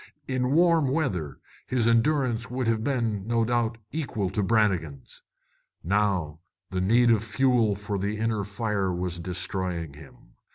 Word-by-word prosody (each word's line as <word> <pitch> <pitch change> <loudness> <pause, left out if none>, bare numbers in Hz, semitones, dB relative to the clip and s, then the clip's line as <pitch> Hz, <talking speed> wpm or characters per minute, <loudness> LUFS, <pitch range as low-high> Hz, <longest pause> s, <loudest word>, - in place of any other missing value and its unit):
In 130 0 0
warm 165 -3 +4
weather 95 - -1 0.3
his 120 -3 +1
endurance 120 0 +2
would 125 0 -2
have 110 -1 +1
been, 115 -7 -1
no 115 -1 +2
doubt, 120 -1 0
equal 110 - -2
to 105 - -1
Brannigan's. 95 - 0 0.6
Now 90 -5 0 0.3
the 95 -1 -1
need 120 +5 +4
of 110 -2 +2
fuel 115 -1 +2
for 105 0 -4
the 100 +2 -2
inner 110 -1 -1
fire 100 -2 -1
was 90 -1 -3
destroying 90 -2 -3
him. 70 -5 -16
110 Hz, 140 wpm, -26 LUFS, 95-120 Hz, 0.6 s, warm